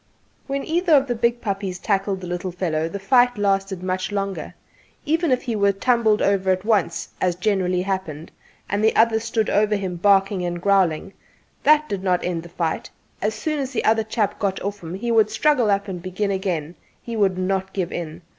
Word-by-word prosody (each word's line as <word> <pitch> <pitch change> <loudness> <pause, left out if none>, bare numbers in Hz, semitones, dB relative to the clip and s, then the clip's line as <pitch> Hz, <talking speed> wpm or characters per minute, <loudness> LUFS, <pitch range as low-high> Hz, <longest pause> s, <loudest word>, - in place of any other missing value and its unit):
When 275 0 -2
either 340 +1 +1
of 275 -2 +6
the 245 - -1
big 235 +1 0
puppies 195 -3 -3
tackled 195 -1 -1
the - - -6
little 180 +1 -3
fellow 165 -3 -1
the 200 - -5
fight 245 +4 +3
lasted 195 -2 0
much 185 +2 -2
longer. 195 -1 -3 0.5
Even 320 0 +1
if 255 - +1
he 235 -3 -2
were 200 -1 +3
tumbled 220 0 +2
over 195 -1 +1
at 185 +1 +1
once 200 -7 0
as 180 -2 +1
generally 180 -2 0
happened 185 -5 -4 0.4
and 205 +2 -1
the 220 - +3
other 225 0 +4
one - - 0
stood 225 -1 -1
over 210 +1 +2
him 190 -3 -3
barking 195 0 +3
and 175 0 -3
growling, 195 -1 +1 0.5
that 305 0 +4
did 200 -7 -3
not 180 -2 0
end 175 -2 -2
the 170 - -12
fight: 165 -2 -3 0.3
as 215 +2 0
soon 305 +7 -2
as 270 -1 -3
the 235 - -1
other 220 0 +3
chap 215 -2 -1
got 195 -2 -1
off 200 +1 -4
him 170 +1 -6
he 235 +5 -2
would 220 -2 +4
struggle 245 0 +2
up 200 0 +1
and 180 -3 -5
begin 190 +3 -2
again; 180 -5 -2 0.3
he 235 - -5
would 195 -4 +2
not 190 +1 -1
give 185 -3 -3
in. 170 0 -6
200 Hz, 205 wpm, -22 LUFS, 185-220 Hz, 0.5 s, of